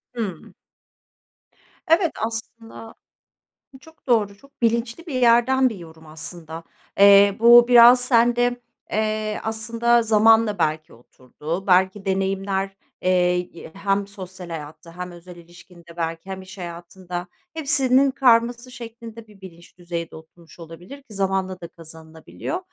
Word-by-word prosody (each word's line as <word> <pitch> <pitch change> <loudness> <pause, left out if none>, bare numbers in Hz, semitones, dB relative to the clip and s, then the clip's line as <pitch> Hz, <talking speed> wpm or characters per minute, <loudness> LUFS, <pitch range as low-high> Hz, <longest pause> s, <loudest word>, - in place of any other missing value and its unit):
Hıı. 200 -9 -6 1.4
Evet, 330 +1 +3
aslında 225 0 -8 0.8
bu 265 - -14
çok 320 +3 -21
doğru, 210 -5 +1
çok 275 +2 -24
bilinçli 235 +7 -1
bir 290 - -5
yerden 250 +2 +4
bir 225 - -8
yorum 160 -3 -14
aslında. 160 +1 -8 0.4
Eee, 200 0 +7
bu 235 +1 +7
biraz 245 0 +7
sende, 245 0 +2 0.3
eee, 215 0 -2
aslında 230 +2 0
zamanla 220 -1 +3
belki 155 -1 -2
oturdu, 150 +9 -8
belki 190 +2 +2
deneyimler, 195 0 -2 0.2
eee, 180 -1 +2
i 175 -2 -10
hem 195 0 -1
sosyal 185 -3 -10
hayatta, 165 +1 -10
hem 180 0 -6
özel 175 +1 -13
ilişkinde 170 0 -17
belki 165 +2 -5
hem 190 0 -6
iş 190 +2 -13
hayatında... 175 0 -8 0.3
Hepsinin 275 -4 +2
karması 240 -1 +2
şeklinde 230 -2 -11
bir 205 -2 -20
bilinç 170 -2 -15
düzeyde 170 -1 -6
oturmuş 160 +2 -17
olabilir 170 - -12
ki 220 - -16
zamanla 190 -1 -2
da 170 - -7
kazanılabiliyor 160 - -9
195 Hz, 125 wpm, -22 LUFS, 175-235 Hz, 1.4 s, Eee